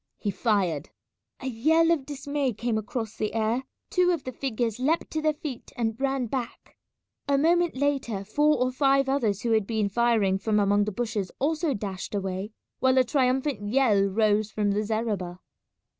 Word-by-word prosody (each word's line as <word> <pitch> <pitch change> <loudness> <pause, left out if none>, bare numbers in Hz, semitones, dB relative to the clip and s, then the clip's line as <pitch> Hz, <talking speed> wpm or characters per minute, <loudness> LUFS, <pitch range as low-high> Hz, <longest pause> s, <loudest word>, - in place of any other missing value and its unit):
He 205 - -2
fired. 190 - 0 0.5
A - - -7
yell 315 +7 +3
of 290 -6 0
dismay 285 -2 -2
came 230 +2 -2
across 220 +1 -3
the 215 +1 -2
air; 225 +4 0 0.3
two 360 -1 +3
of 335 -6 0
the 255 - -5
figures 240 -3 -2
leapt 305 +6 0
to 315 - -1
their 310 0 +3
feet 285 -5 -7
and 225 -2 0
ran 270 -2 0
back. 240 0 -5 0.5
A 280 0 +3
moment 340 +3 +2
later 260 -7 -1
four 295 +8 +2
or 250 +1 +1
five 275 +1 +3
others 230 -8 0
who 235 - 0
had 220 -3 +2
been 215 -3 0
firing 215 -3 +2
from 210 +1 +1
among 205 0 +3
the 210 - -2
bushes 210 -3 -3
also 310 0 0
dashed 200 -1 -5
away, 190 0 -3 0.3
while 260 0 +3
a 260 - +6
triumphant 260 -1 +1
yell 230 -5 +3
rose 210 +1 +2
from 205 -1 0
the 205 +1 +1
zareba. 210 -5 -2
235 Hz, 175 wpm, -26 LUFS, 210-275 Hz, 0.5 s, a